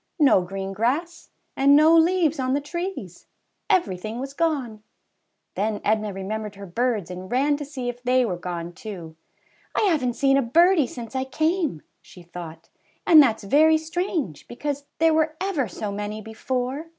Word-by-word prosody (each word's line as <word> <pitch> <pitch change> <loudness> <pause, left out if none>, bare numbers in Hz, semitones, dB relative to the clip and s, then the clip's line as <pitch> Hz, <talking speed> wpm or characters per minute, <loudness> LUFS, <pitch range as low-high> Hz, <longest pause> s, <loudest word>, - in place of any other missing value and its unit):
No 280 - +5
green 195 +2 -5
grass, 275 - -2 0.3
and 275 +1 +5
no 310 +2 +6
leaves 330 -2 +3
on 260 0 0
the - - +1
trees! 320 - -6 0.4
Everything 215 - 0
was 270 +1 -6
gone! 280 -9 -1 0.7
Then 210 +1 -1
Edna 215 0 +1
remembered 205 +2 -5
her 200 0 -9
birds 210 -1 -1
and 185 +1 -8
ran 280 +4 +2
to 290 - -6
see 270 -3 -6
if 245 0 -5
they 250 0 +2
were 190 -6 -2
gone 175 -1 -6
too. 185 -9 -9 0.6
havenT 295 - +1
seen 275 0 +3
a - - +3
birdie 330 +4 +4
since 235 +1 -9
I 260 - 0
came,'' 315 - -1 0.2
she 180 - -15
thought, 170 -2 -10 0.4
'^and 320 -3 +9
that's 230 -6 +2
very 310 +9 +4
strange, 320 - -3
because 285 +3 -4
there 325 0 +4
were 315 0 +1
ever 360 - -1
so 205 +2 -5
many 210 +1 -4
before." 250 +7 -4
255 Hz, 165 wpm, -24 LUFS, 205-310 Hz, 0.7 s, ^and